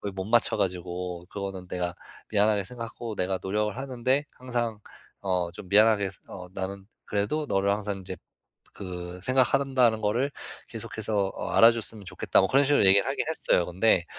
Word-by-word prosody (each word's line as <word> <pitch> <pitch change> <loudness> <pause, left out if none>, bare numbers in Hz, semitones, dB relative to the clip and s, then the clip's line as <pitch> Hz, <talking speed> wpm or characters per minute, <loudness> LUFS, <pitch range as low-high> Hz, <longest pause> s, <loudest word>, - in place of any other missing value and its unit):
못 95 - -3
맞춰 120 +3 +3
가지고 90 -1 -3
그거는 95 -2 -6
내가 90 -1 -2 0.4
미안하게 105 -1 +3
생각하고 115 +1 -7
내가 95 0 0
노력을 105 +2 -1
하는데 130 +1 0
항상 120 -4 -3 0.4
어 90 -3 0
좀 95 - -10
미안하게 105 -1 +5 0.2
어 90 -1 -9
나는 95 +1 -5 0.2
그래도 105 +10 -1
너를 100 0 +1
항상 100 -1 -2
이제 95 0 -6 0.6
그 90 -2 -7
생각하는 135 +2 +2
다는 115 -4 +4
것을 120 +7 0 0.4
계속해서 110 -3 -2
어 - - -4
알아줬으면 115 -2 +4
좋겠다." - - +1
뭐 95 - +1
그런 140 +2 +4
식으로 145 -5 +4
얘기를 100 +5 +6
하긴 135 - -1
했어요. 125 - +1
근데 90 0 +2
105 Hz, 360 characters per minute, -27 LUFS, 95-120 Hz, 0.6 s, 얘기를